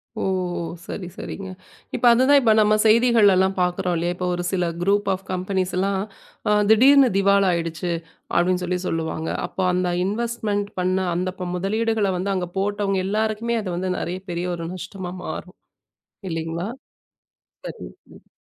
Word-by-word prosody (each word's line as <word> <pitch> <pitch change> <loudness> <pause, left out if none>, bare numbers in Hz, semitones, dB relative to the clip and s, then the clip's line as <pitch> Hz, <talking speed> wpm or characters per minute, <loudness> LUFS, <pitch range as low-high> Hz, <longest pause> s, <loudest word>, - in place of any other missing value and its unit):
ஓ! - - -4 0.6
சரி, 180 - -6
சரிங்க. 195 -1 -7 0.5
இப்ப - - -1
அதுதான். 260 +4 +5
இப்ப 225 -4 +4
நாம 215 0 +4
செய்திகள்லா 215 -4 +5
பாக்கிறோ 180 +1 0
இல்லையா, 175 +1 -1 0.2
ஒரு 175 - -3
சில 180 -2 0 0.2
குரூப் 200 +2 +2
ஆஃப் 190 +1 -6
கம்பனீஸ்லா 185 +1 -1 0.6
அ - - +4 0.2
திடீர்னு 265 +4 +7
திவால் 200 0 +4
ஆயிடுச்சு 170 0 -2 0.4
அப்டின்னு 180 +1 +2
சொல்லிச் 180 +1 -2
சொல்லுவாங்க. 160 0 -2 0.2
அப்போ 190 - -3
அந்த 180 0 +1 0.2
இன்வேஸ்ட்மெண்ட் 210 -1 -2
பண்ண 185 +1 +1 0.2
அந்த 180 +2 -1
ப 180 -1 -3
முதலீடுகள 210 +2 0
வந்து 195 +3 -2
அங்க 180 -1 -2
போட்டவங்க 200 0 0
எல்லாருக்குமே 220 +3 0
அது 195 - -5
வந்து 185 +1 -2
நறைய 180 +2 -3
பெரிய 175 +1 -2
ஒரு 165 -1 -6
நஷ்டமா 185 -1 -7
மாறு. - - -6 0.8
இல்லைங்களா? 165 +3 -3 1.0
சரி. - - -7 0.3
ம். - - -19
190 Hz, 140 wpm, -23 LUFS, 180-210 Hz, 1.0 s, திடீர்னு